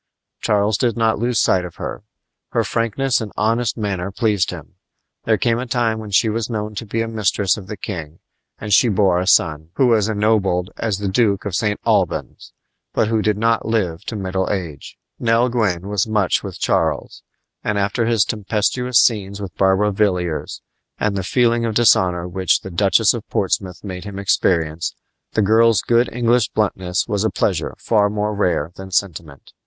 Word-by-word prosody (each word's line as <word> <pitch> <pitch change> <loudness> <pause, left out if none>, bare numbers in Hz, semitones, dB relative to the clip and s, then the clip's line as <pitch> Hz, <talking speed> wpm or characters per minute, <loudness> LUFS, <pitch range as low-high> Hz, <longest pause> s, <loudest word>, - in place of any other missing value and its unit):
Charles 105 0 +1
did 120 -3 0
not 110 -2 +1
lose 120 +1 0
sight 90 -1 +2
of 90 -2 -8
her. - - -6 0.5
Her - - +2
frankness 120 +3 0
and 105 -2 -5
honest 115 +2 0
manner 100 -4 -2
pleased 105 -2 +1
him. - - -9 0.5
There 110 -1 +3
came 115 -1 +1
a 130 - -4
time 115 -2 0
when 110 -1 -8
she 100 +3 +3
was 110 +1 -2
known 105 -2 -3
to 105 +2 -6
be 115 +2 -1
a - - -4
mistress 105 -3 +1
of 100 -4 -10
the 105 - -6
king, 80 -5 -6 0.4
and 105 -1 -3
she 120 +4 +5
bore 95 -3 +2
a 90 - -2
son, 80 -4 +2
who 135 - +3
was 110 -3 +3
ennobled 105 -4 +1
as 110 -4 -2
the 100 0 -3
Duke 100 0 +1
of 100 - -4
St. 105 +2 0
Albans, - - -1 0.4
but 110 - +2
who 110 -1 +1
did 105 -1 +1
not 115 +1 +1
live 95 -6 -1
to 115 - -5
middle 95 -2 -2
age. 85 -8 -5 0.2
Nell 115 +1 +2
Gwyn 100 -7 -1
was 105 0 0
much 105 -4 +1
with - - -8
Charles; - - -1 0.4
and 105 - -1
after 100 +3 0
his 115 -3 +3
tempestuous 110 +4 0
scenes 100 -4 +2
with 95 -5 -7
Barbara 95 +2 +2
Villiers, 90 -6 -1 0.3
and 105 -1 -1
the 95 - -1
feeling 120 +3 +2
of 115 -2 -2
dishonor 90 -6 +3
which 95 +1 +1
the 95 - -8
Duchess 95 +1 +3
of - - -7
Portsmouth 90 -2 -2
made 90 -2 -7
him 100 -1 -7
experience, 85 -4 0 0.4
the 110 - +2
girl's 110 +1 +4
good 120 +1 +2
English 120 0 +2
bluntness 95 -4 -1
was 105 -3 -1
a 110 - +2
pleasure - - -1
far 105 -3 +2
more 105 0 -2
rare 90 -6 0
than 95 0 -9
sentiment. 85 -6 -3
105 Hz, 185 wpm, -20 LUFS, 95-115 Hz, 0.5 s, she